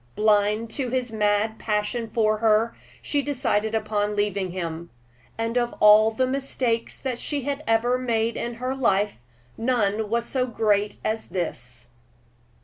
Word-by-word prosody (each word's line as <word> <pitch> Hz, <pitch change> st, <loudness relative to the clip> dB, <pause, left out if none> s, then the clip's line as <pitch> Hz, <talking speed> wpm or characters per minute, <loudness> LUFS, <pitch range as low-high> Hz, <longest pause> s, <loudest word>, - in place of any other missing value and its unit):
Blind 210 Hz, +1 st, +2 dB
to 255 Hz, +1 st, -2 dB
his 250 Hz, -1 st, -2 dB
mad 215 Hz, 0 st, +1 dB
passion 220 Hz, +2 st, -1 dB
for 215 Hz, -1 st, +2 dB
her, 225 Hz, +1 st, +3 dB, 0.3 s
she 290 Hz, -, 0 dB
decided 240 Hz, -6 st, 0 dB
upon 210 Hz, -1 st, -1 dB
leaving 200 Hz, -2 st, 0 dB
him; 170 Hz, -2 st, -5 dB, 0.5 s
and 230 Hz, +2 st, 0 dB
of 240 Hz, 0 st, -2 dB
all 210 Hz, +1 st, +7 dB
the 225 Hz, +4 st, 0 dB
mistakes 255 Hz, -3 st, -2 dB
that 255 Hz, -3 st, -3 dB
she 285 Hz, -3 st, -3 dB, 0.2 s
ever 240 Hz, +3 st, +2 dB
made 230 Hz, -2 st, 0 dB
in 240 Hz, 0 st, -4 dB
her 255 Hz, +2 st, -3 dB
life, 205 Hz, -, +1 dB, 0.4 s
none 220 Hz, -3 st, 0 dB
was 235 Hz, +1 st, 0 dB
so 255 Hz, 0 st, -1 dB
great 210 Hz, -3 st, +1 dB
as 220 Hz, +1 st, -2 dB
this. 125 Hz, -9 st, -5 dB
220 Hz, 140 wpm, -24 LUFS, 210-240 Hz, 0.5 s, all